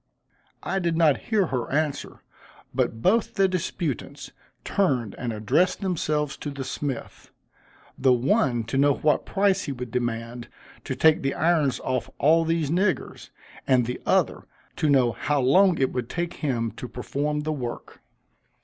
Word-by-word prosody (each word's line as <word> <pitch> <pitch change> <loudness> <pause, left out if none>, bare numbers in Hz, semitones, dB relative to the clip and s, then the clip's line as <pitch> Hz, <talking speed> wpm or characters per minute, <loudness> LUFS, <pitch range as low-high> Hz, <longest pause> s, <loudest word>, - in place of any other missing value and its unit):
I 195 - -1
did 170 -3 0
not 155 -4 +4
hear 215 -4 +3
her 125 -2 -2
answer, 150 0 -2 0.5
but 110 0 -1
both 230 +4 +2
the 195 -1 +4
disputants 175 - -4 0.3
turned 130 - 0
and 120 -2 -2
addressed 110 - +1
themselves 155 -6 -1
to 145 - -5
the 140 -1 -5
smith 135 -1 -5 0.7
the 130 - +4
one 125 -1 +2
to 115 +4 -2
know 140 0 +4
what 150 -1 +1
price 195 -1 +1
he 145 - -3
would 125 -3 -6
demand 120 0 -3 0.4
to - - -3
take 160 -1 +4
the 135 0 -1
irons 160 -5 +2
off 130 -2 -2
all 165 +3 +4
these 165 -3 0
niggers, 185 +2 -1 0.4
and 125 -2 +4
the 125 +1 -5
other - - +1 0.3
to 155 - +1
know 130 -4 +4
how 145 +5 -1
long 175 +7 +4
it 130 - +1
would 125 -2 -3
take 175 0 -3
him 120 -7 -1
to 125 - -6
perform 145 +5 -3
the 155 +1 -2
work. 125 -5 -6
145 Hz, 160 wpm, -25 LUFS, 125-170 Hz, 0.7 s, not